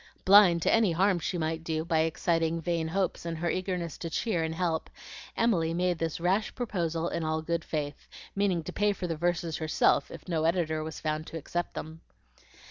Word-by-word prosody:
Blind 190 -4 +7
to - - +3
any 225 -6 +4
harm 185 +1 +3
she 175 - -2
might 160 0 -2
do 160 -1 -2
by 165 -2 +1
exciting 165 +1 +1
vain 165 -1 -1
hopes 185 +2 -1
in 170 -1 -3
her 170 +1 -1
eagerness 180 -3 -3
to 165 - -4
cheer 175 +1 0
and 160 0 -2
help, 165 -2 -1 0.5
Emily 170 -8 +2
made 180 -1 0
this 165 -1 -2
rash 190 +5 0
proposal 170 -8 -1
in 170 - -2
all 155 0 -1
good 170 0 -1
faith, 150 -3 -4 0.3
meaning 195 -4 +1
to - - -7
pay 205 0 +2
for 190 - -5
the 165 -2 -2
verses 170 0 -1
herself 155 -1 +2
if - - -11
no 160 -3 0
editor 160 -2 +1
was 160 0 -6
found 155 0 -2
to 165 - -6
accept 175 +3 -4
them. 160 +1 -7
165 Hz, 200 wpm, -29 LUFS, 160-180 Hz, 0.5 s, Blind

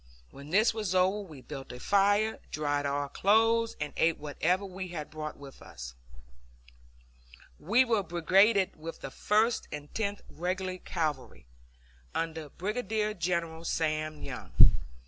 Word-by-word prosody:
When 140 +2 -11
this 215 +7 +4
was 210 -4 -2
over, 185 +3 +3
we 160 -10 -9
built 135 0 -8
a 125 - -8
fire, 205 - +3
dried 145 -1 -1
our 140 0 -1
clothes, 225 +7 +3
and 150 -1 -3
ate 165 0 +2
whatever 165 +6 0
we 185 -1 -6
had 160 -4 -6
brought 155 -1 -6
with 140 -1 -12
us. 60 0 -9 1.7
We 235 +9 +4
were 225 -4 +2
brigaded 190 +3 +3
with 165 +1 -8
the 135 - -6
First 220 - +1
and 145 0 -7
Tenth 205 -2 -2
Regular 185 +2 -3
Cavalry, 150 - -3 0.7
under 160 -2 -3
Brigadier 215 - -2
General 170 -3 -2
Sam 155 -2 -1
Young. - - -7
175 Hz, 135 wpm, -30 LUFS, 150-205 Hz, 1.7 s, this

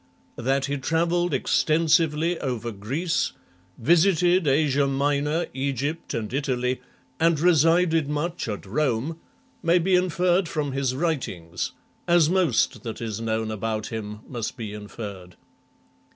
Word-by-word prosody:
That 135 +3 +1
he 140 0 -2
travelled 170 +4 +1
extensively 160 +3 +2
over 120 -3 -3
Greece, 135 - -1 0.4
visited 175 +4 +3
Asia 140 0 +3
Minor, 145 +4 0
Egypt, 140 +4 -2
and 110 0 -4
Italy, 130 -2 -1 0.4
and 165 -2 +3
resided 165 -1 +3
much 155 +1 -2
at 105 -2 -4
Rome, 140 - -1 0.4
may 170 +2 +4
be 180 +2 +1
inferred 180 0 +2
from 150 -3 -2
his 130 -1 -1
writings, 100 - -2 0.3
as 170 -2 +4
most 180 -11 +2
that 115 -3 -6
is 110 -2 -4
known 110 -1 -1
about 110 0 -3
him 105 -1 -5
must 120 -1 -4
be 110 -3 -5
inferred. 100 -4 -8
140 Hz, 125 wpm, -25 LUFS, 115-165 Hz, 0.4 s, may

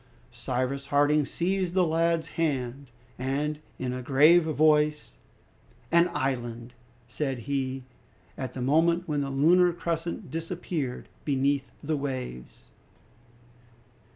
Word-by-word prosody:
Cyrus 130 +2 -3
Harding 145 0 +3
seized 185 0 -1
the 185 -1 +4
lad's 165 0 +1
hand, 140 -4 -2 0.3
and 145 +3 -1 0.2
in 125 -1 -3
a 130 - -4
grave 150 +7 +5
voice, 150 -1 +2 0.7
"An 170 +1 +5
island!" 120 -4 -3 0.3
said 130 +1 -3
he, 135 +1 -2 0.5
at 130 -2 -5
the 125 - -4
moment 170 +6 +2
when 150 -2 0
the 140 - -2
lunar 175 +6 +4
crescent 170 0 -4
disappeared 165 -5 -4 0.2
beneath 140 -1 0
the 155 +1 -1
waves. 130 - -6
145 Hz, 110 wpm, -27 LUFS, 130-165 Hz, 0.7 s, grave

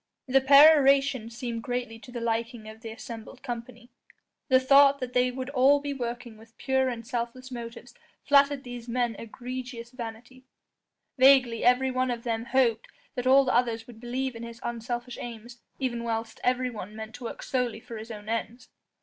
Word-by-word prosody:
The 265 +1 +4
peroration 275 -3 +6
seemed 235 -1 -5
greatly 245 -2 -4
to 245 - -13
the 240 -1 -5
liking 230 0 -2
of 220 +1 -11
the 225 - -7
assembled 230 +2 -9
company: 240 -1 -7 0.6
the 260 -2 +5
thought 275 +1 +6
that 250 -1 -5
they 250 0 +3
would 260 +2 -5
all 280 +1 +5
be 285 0 -4
working 240 -3 -5
with 225 +1 -18
pure 265 -1 +1
and 230 -2 -6
selfless 245 +2 -4
motives 235 -1 -8 0.3
flattered 280 -1 +4
these 245 -2 -8
men's 240 -2 -1
egregious 245 0 -7
vanity; 245 +1 -9 0.8
vaguely 260 -3 +5
every 250 +2 +4
one 255 0 0
of 235 -1 -3
them 230 -1 -2
hoped 250 -4 +1 0.3
that 250 -2 -3
all 270 +1 +6
the 260 - 0
others 230 -2 +1
would 230 -2 -13
believe 250 +2 -3
in 230 - -8
his 235 0 -8
unselfish 240 +1 -4
aims, 235 0 -9 0.2
even 240 -3 -2
whilst 225 -1 -3
everyone 245 -5 -1
meant 220 0 -8
to 245 - -9
work - - -6
solely 245 -4 -1
for 235 -1 -9
his 220 +2 -9
own 210 -2 -9
ends. 230 +2 -4
245 Hz, 175 wpm, -27 LUFS, 230-260 Hz, 0.8 s, peroration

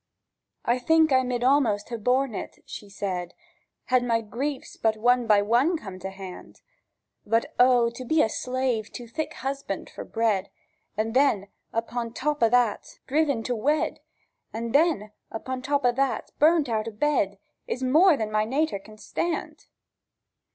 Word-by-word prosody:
"I 240 +2 +2
think 320 +4 +4
I 260 - +5
mid 250 -1 -2
almost 250 -6 +2
ha' 235 -2 -5
borne 255 +1 +2
it," - - -7
she 205 - -9
said, 185 -3 -4 0.5
"Had 255 -1 +2
my 230 -2 +2
griefs 260 +6 -4
one 230 +2 +3
by 205 -2 +5
one 250 - +3
come 190 -9 -9
to 190 - -5
hand; 190 -1 -10 0.6
But 225 +2 0
O, 245 -2 +5
to 245 +2 -8
be 305 0 +3
slave 250 -2 -2
to 245 - -7
thik 300 +7 -4
husbird 270 -7 -4
for - - -7
bread, 220 -4 0 0.5
And 220 +1 -1
then, 235 -8 +3 0.2
upon 230 0 -3
top 295 +3 -1
o' 230 - +5
that, 245 -3 +1
driven 280 -4 +1
to 245 - -1
wed, 295 +7 0 0.5
And 230 +1 -4
then, 285 -9 +2 0.2
upon 255 +3 -5
top 280 0 0
o' 245 - +5
that, 270 +2 -1
burnt 310 -1 +4
out 220 -2 -1
o' - - -3
bed, 210 -4 0 0.3
Is 260 - -3
more 310 +6 +5
than 215 -3 -3
my 215 0 +2
nater 270 0 0
can 215 +2 -15
stand!" 335 +10 -4
245 Hz, 160 wpm, -26 LUFS, 215-275 Hz, 0.6 s, I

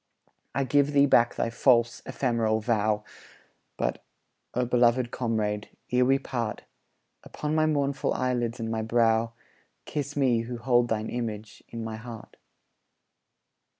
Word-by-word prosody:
I 140 - +2
give 140 +2 +2
thee 140 0 +6
back 120 -4 +4
thy 115 - -1
false, 120 -1 +3
ephemeral 115 -4 0
vow; 110 -1 +1 0.7
But, - - -2 0.5
O 125 0 +1
beloved 120 0 +3
comrade, 105 -3 -1 0.2
ere 125 0 +4
we 135 +1 +4
part, 120 -5 -4 0.6
Upon 150 0 -4
my 155 0 +3
mournful 140 -2 0
eyelids 120 -2 -1
and 115 0 -3
my 110 -1 -1
brow 115 0 +2 0.5
Kiss 145 -1 -4
me 130 -5 +3
who 120 +1 -4
hold 120 0 +2
thine 110 -1 -2
image 110 -3 -5
in 115 -1 -6
my 110 -1 -5
heart. 115 -1 -10
120 Hz, 135 wpm, -27 LUFS, 115-130 Hz, 0.7 s, thee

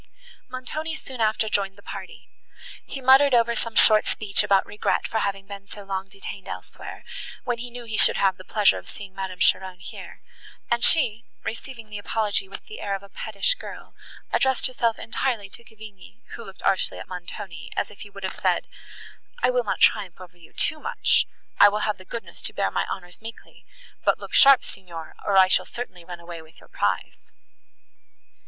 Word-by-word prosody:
Montoni 310 +5 -4
soon 260 -5 -7
after 220 0 +2
joined 195 -2 0
the 200 - -16
party. 195 -2 -8 0.6
He 270 - -6
muttered 265 +1 +7
over 235 0 +4
some 230 -1 -3
short 215 -1 +7
speech 205 -2 +1
about 195 -1 +4
regret 210 0 0
for 220 - 0
having 195 -1 -1
been 200 0 -9
so 205 - -9
long 195 0 -3
detained 195 0 -8
elsewhere, - - -8 0.4
when 240 -1 -1
he 245 +1 -5
knew 240 0 -8
he 220 -2 -1
should - - +5
have 190 -1 +3
the 185 - -11
pleasure 210 +1 +3
of - - -15
seeing 200 -2 -9
Madame 190 -1 -4
Cheron 185 0 +3
here; - - -10 0.5
and 235 0 +2
she, 240 -8 +4 0.2
receiving 230 -1 -6
the 205 - -4
apology 205 -2 0
with - - -9
the 435 - -9
air 200 -1 -1
of 195 - -7
a 200 - -13
pettish 215 - +1
girl, - - -10 0.4
addressed 265 -1 +3
herself 235 -3 +1
entirely 225 -3 -2
to 235 - -10
Cavigni, 220 0 -13
who 230 - -7
looked 195 -3 -12
archly 190 - +1
at - - -8
Montoni, 180 -1 -7
as - - 0
if 205 - -15
he 205 - -8
would 195 -1 -11
have 190 - -2
said, - - +1 0.8
"I - - +5
will 250 -1 +2
not 210 - -1
triumph 195 -5 +3
over 180 -1 -12
you 170 -2 -17
too 310 - 0
much; 470 +7 +2 0.3
I 205 - +10
will 210 +1 -1
have 210 -2 -1
the 185 - -12
goodness 230 +3 -7
to - - -2
bear - - 0
my - - 0
honours 180 +2 -6
meekly; 225 +1 -11 0.4
but - - +3
look - - -10
sharp, 275 -1 +8
Signor, 170 -4 -9
or 200 -1 +2
I 190 - +9
shall - - +3
certainly 190 -8 -7
run 175 0 -8
away 170 -1 -8
with 160 0 -18
your - - -18
prize." - - -1
205 Hz, 195 wpm, -25 LUFS, 190-235 Hz, 0.8 s, I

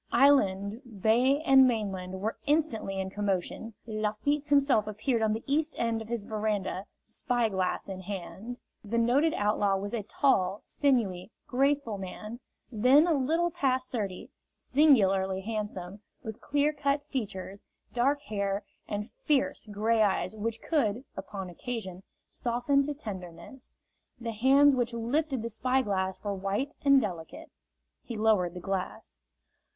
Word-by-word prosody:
Island, 210 -6 +3 0.2
bay 255 +6 +4
and 270 -3 +7
mainland 190 -5 -2
were 220 +2 -1
instantly 285 -10 0
in 190 0 -3
commotion. 205 +2 -2
Lafitte 220 +7 -1
himself 280 -7 +3
appeared 220 +3 -1
on 215 -1 +2
the 225 - -4
east 300 +3 0
end, 230 -1 0
of 220 - -8
his 235 -2 -3
veranda, 210 -3 -2 0.2
spy 240 -3 -1
glass 190 -2 -1
in 190 -1 -6
hand. 195 +5 -7 0.2
The 220 +2 -2
noted 260 +8 +3
outlaw 205 -1 +2
was 200 +2 -5
a 230 - -1
tall, 200 -4 +1
sinewy, 220 -11 0 0.2
graceful 270 -4 +1
man, 210 +5 -7 0.3
then 255 +7 +5
a 345 - +2
little 320 +5 +1
past 260 -3 0
thirty, 200 -6 -4 0.2
singularly 195 -10 +3
handsome, 205 -2 -5 0.2
with 220 -1 -7
clear 290 +1 +1
cut 285 0 0
features, 200 -7 -5 0.3
dark 275 +4 +1
hair 200 -1 -2 0.2
and 210 +3 -4
fierce 285 -4 +1
gray 220 +2 +1
eyes 210 +1 +1
which 225 +1 -3
could, 255 -6 0
upon 195 0 -6
occasion, 190 -1 -6 0.3
soften 245 +4 +1
to 295 - -3
tenderness. 190 - -9 0.4
The 230 -1 -4
hands 270 +6 +5
which 245 -2 0
lifted 265 +2 -1
the 230 - -3
spy 255 +4 +1
glass 190 -2 -1
were 205 -1 -1
white 195 +9 -2
and 275 -1 +6
delicate. 175 -9 -6 0.5
He 235 - -7
lowered 210 -5 +2
the - - -5
glass. 180 - -4
220 Hz, 140 wpm, -29 LUFS, 195-265 Hz, 0.5 s, and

